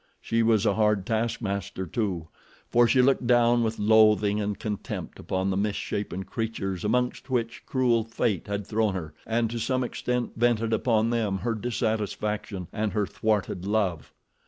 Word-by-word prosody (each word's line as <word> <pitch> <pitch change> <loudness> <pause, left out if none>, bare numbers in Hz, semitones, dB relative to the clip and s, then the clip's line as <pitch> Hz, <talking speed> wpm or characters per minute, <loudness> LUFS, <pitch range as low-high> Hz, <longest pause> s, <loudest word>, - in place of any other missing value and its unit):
She 115 0 0
was 110 -2 +3
a 100 - +3
hard 105 -2 +2
taskmaster, 110 -4 -2
too, 90 -4 -2 0.4
for 120 0 +5
she 125 +3 +4
looked 130 -2 +2
down 120 0 +4
with 115 -1 -1
loathing 105 -1 +4
and 105 0 -2
contempt 105 -2 -5
upon 95 +1 -1
the 95 - -1
misshapen 100 -2 -2
creatures 95 -3 -3
amongst 125 +5 0
which 120 -2 -2
cruel 120 -4 +2
Fate 115 -4 -1
had 100 0 -3
thrown 110 -2 0
her 80 -4 -5
and 115 0 +1
to 120 - -3
some 130 +3 0
extent 125 0 -2
vented 115 -1 +1
upon 115 0 +2
them 110 -5 0
her 115 +4 -1
dissatisfaction 105 -4 -2
and 105 -3 -1
her 105 0 +1
thwarted 100 -3 -1
love. 100 -7 0
110 Hz, 160 wpm, -26 LUFS, 100-115 Hz, 0.4 s, for